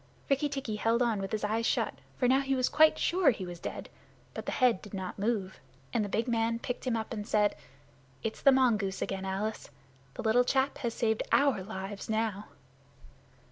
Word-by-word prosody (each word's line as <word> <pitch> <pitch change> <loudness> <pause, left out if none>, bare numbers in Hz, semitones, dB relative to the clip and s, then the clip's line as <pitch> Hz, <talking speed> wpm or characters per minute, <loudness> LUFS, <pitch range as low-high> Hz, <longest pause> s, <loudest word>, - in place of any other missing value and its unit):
Rikki 275 +2 +2
tikki 270 -6 -3
held 230 +3 +2
on 230 -4 +1
with 195 - -4
his 215 -1 -2
eyes 220 +2 0
shut, - - +1 0.2
for 250 - +2
now 260 +2 +5
he 270 -1 0
was 255 -1 +1
quite 310 0 +5
sure 355 -3 +3
he 210 -7 -1
was 175 -1 -8
dead. - - -6 0.5
But - - -7
the - - 0
head 245 -7 +3
did 205 -1 -9
not 190 0 -5
move, 200 -3 -1 0.3
and 225 - +2
the 205 - -3
big 225 +5 -1
man 230 -1 +1
picked 245 +2 -5
him 235 -2 +1
up 220 +1 -4
and 210 -2 -5
said, 210 -1 +2 0.7
"It's 225 - -4
the 275 - +7
mongoose 220 -7 +2
again, 195 0 -4
Alice. 200 +3 -3 0.5
The - - -5
little 230 +2 +4
chap 265 +2 +1
has 235 -2 -2
saved 220 -2 +1
our 275 -8 +3
lives 195 0 -6
now." 215 -2 -1
225 Hz, 200 wpm, -30 LUFS, 205-250 Hz, 0.7 s, the